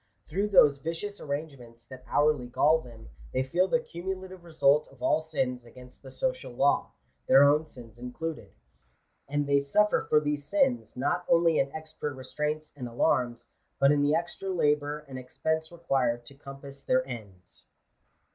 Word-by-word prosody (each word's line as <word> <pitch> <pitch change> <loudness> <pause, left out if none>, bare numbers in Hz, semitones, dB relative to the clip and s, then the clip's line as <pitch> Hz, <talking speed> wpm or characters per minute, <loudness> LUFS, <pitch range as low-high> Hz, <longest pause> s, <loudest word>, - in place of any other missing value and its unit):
Through 195 +6 0
those 150 -8 +6
vicious 170 +7 -5
arrangements 140 -6 -6
that 130 -1 -12
hourly 145 -4 +2
gall 150 +6 +3
them, 115 -4 -13 0.2
they 130 - +1
feel 175 +8 +1
the 245 - +2
cumulative 185 -2 -6
result 150 -3 +3
of 130 -2 -15
all - - +3
sins 130 -6 -2
against 125 +1 -14
die - - -11
social - - -3
law; - - +2 0.3
their 135 - +7
own 150 +2 +4
sins 120 -4 -13
included. 150 +6 -6 0.8
And 145 0 0
they 140 0 +3
suffer 210 +10 +2
for 150 - +6
these 145 -1 -2
sins, 265 - 0
not 145 +7 0
only 165 -2 +4
in 135 0 +1
extra 155 -1 -5
restraints 150 +3 -4
and 125 -4 -6
alarms, 120 -1 0 0.3
but 140 +1 +5
in 145 -1 +3
the 145 +2 +3
extra 175 +3 -3
labour 150 -3 0
and 130 -1 -7
ex 125 0 -13
pense 160 0 -1
required 130 -8 0
to 140 - -11
compass 140 0 -10
their 130 0 +2
ends. 100 -8 -8
145 Hz, 165 wpm, -28 LUFS, 130-160 Hz, 0.8 s, their